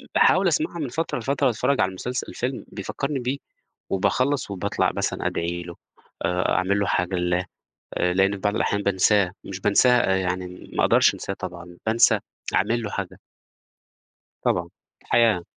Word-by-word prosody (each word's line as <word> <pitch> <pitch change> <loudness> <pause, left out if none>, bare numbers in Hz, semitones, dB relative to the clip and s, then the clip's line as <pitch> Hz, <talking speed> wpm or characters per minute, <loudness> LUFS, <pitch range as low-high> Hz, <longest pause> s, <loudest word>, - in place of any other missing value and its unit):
باحاول - - +5
أسمعها 310 - 0
من 145 -5 -2
فترة 160 +2 -2
لفترة 140 +3 +1
وأتفرج 130 +3 +1
على - - +2
المسلسل 125 +7 -4
الفيلم 125 +1 -4
بيفكّرني 135 +8 -3
بيه 125 +3 -2 0.5
وباخلّص 130 +6 +1
وباطلع 95 -2 0
مثلًا - - -1
أدعي 85 +1 -2
له 85 0 -9 0.5
آآ، 90 0 +1
أعمل 95 +3 +1
له 100 - +1
حاجة 90 +2 0
لله 90 +1 0 0.5
آآ، 90 - +1
لأن 95 +1 +3
في 100 - -3
بعض 105 +2 -1
الأحيان 100 -1 0
بانساه 100 -1 +3
مش 95 -1 -6
بانساه 105 +1 +4
يعني 90 -1 -3
ما - - +1
أقدرش - - +5
أنساه - - -5
طبعًا 85 0 -8
بانسى 115 +1 +4 0.4
أعمل 120 +1 +2
له 105 - -3
حاجة. 100 -3 -5 1.2
طبعًا. 85 0 0 0.4
الحياة. 110 -7 +3
100 Hz, 155 wpm, -24 LUFS, 90-125 Hz, 1.2 s, باحاول